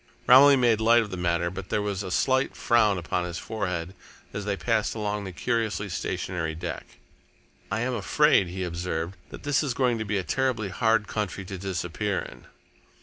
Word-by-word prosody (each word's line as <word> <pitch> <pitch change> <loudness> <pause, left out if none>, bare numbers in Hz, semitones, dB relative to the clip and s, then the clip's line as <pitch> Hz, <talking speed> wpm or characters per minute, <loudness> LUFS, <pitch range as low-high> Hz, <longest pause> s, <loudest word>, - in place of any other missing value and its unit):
Romilly 140 +3 +8
made 120 -4 +3
light 115 +1 +5
of 105 - -9
the - - -3
matter, 85 -1 0
but 95 0 -7
there - - +1
was 105 -2 -2
a 95 - -5
slight 130 +8 +1
frown 110 -4 +3
upon 90 +1 -2
his 85 -1 -4
forehead 90 -5 -3 0.4
as 100 - -4
they 100 -1 -1
passed 105 +7 0
along 105 -1 -2
the 95 - -5
curiously 110 +1 -1
stationary 85 -3 -3
deck. 85 +1 -7 0.7
"I 110 +2 0
am 130 +1 -1
afraid," 145 - +3
he 95 +2 -4
observed, 85 0 -3
"that - - -10
this 145 -1 +2
is 135 -6 -2
going 125 -3 +1
to - - -1
be 105 -1 -1
a 95 - -1
terribly 120 0 -1
hard 110 +1 +1
country 95 -3 -3
to 95 - -6
disappear 95 +1 -2
in." - - -7
105 Hz, 190 wpm, -26 LUFS, 90-115 Hz, 0.7 s, Romilly